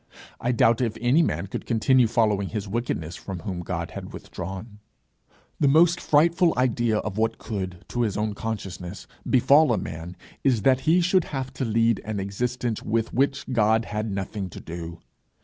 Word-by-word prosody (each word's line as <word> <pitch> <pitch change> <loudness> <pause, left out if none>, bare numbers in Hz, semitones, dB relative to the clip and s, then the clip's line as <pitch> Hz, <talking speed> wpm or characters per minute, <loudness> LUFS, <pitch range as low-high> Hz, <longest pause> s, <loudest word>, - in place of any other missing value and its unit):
I 120 - 0
doubt 115 0 +3
if 115 -3 -1
any 125 +7 +4
man 85 - 0
could 100 - -6
continue 125 +1 +4
following 105 -4 +1
his 105 -2 -4
wickedness 95 -7 -3
from 95 -2 -7
whom 90 +1 -4
God 90 - -4
had - - -8
withdrawn. 95 +4 -7 0.8
The 145 - +3
most 165 +5 +5
frightful 165 +3 +3
idea 120 -3 +2
of 105 0 -3
what 110 0 +1
could, 95 -5 -5
to 120 - -1
his 110 -5 0
own 105 0 -1
consciousness, 100 -4 -5 0.2
befall 140 +3 +5
a 115 - +2
man, 80 +3 -6 0.3
is 125 -7 +2
that 130 +1 +4
he 175 +2 +5
should 180 0 +3
have 135 -2 -5
to 130 - -2
lead 115 0 +2
an 105 -1 -3
existence 115 +4 -2
with 115 0 -1
which 140 +2 +1
God 110 -1 +3
had 105 +1 -3
nothing 95 0 -4
to - - -9
do. 85 0 -7
110 Hz, 175 wpm, -25 LUFS, 100-125 Hz, 0.8 s, most